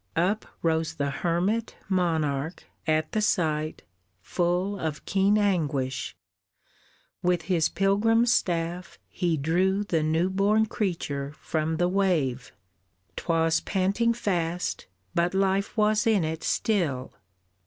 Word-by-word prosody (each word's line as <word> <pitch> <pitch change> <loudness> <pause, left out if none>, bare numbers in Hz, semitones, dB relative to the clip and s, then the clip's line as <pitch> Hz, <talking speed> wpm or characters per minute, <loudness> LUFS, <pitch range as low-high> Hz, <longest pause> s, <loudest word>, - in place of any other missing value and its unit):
Up 190 +6 +1 0.2
rose 160 -1 0
the 140 -2 -1
hermit 185 +9 -1
monarch 160 -5 0 0.2
at 155 0 +1
the 215 - 0
sight 155 -6 0 0.4
Full 180 - 0
of 155 -2 -4
keen 195 +2 +3
anguish; 150 - 0 1.1
with 180 -2 +1
his 160 -2 +1
pilgrim 205 +6 +3
staff 175 -7 0
He 170 -3 0
drew 185 +7 +1
the 170 -6 0
new 160 +4 +1
born 205 +3 +3
creature 150 -10 -3
from 160 0 -1
the 175 +1 +2
wave; 175 -10 0 0.6
'Twas 165 -1 +1
panting 200 +5 +1
fast, 175 -5 -2 0.3
but 175 +2 +1
life 195 +2 +1
was 215 +1 +3
in 210 -6 +3
it 160 0 -3
still. 155 - 0
175 Hz, 115 wpm, -26 LUFS, 160-195 Hz, 1.1 s, keen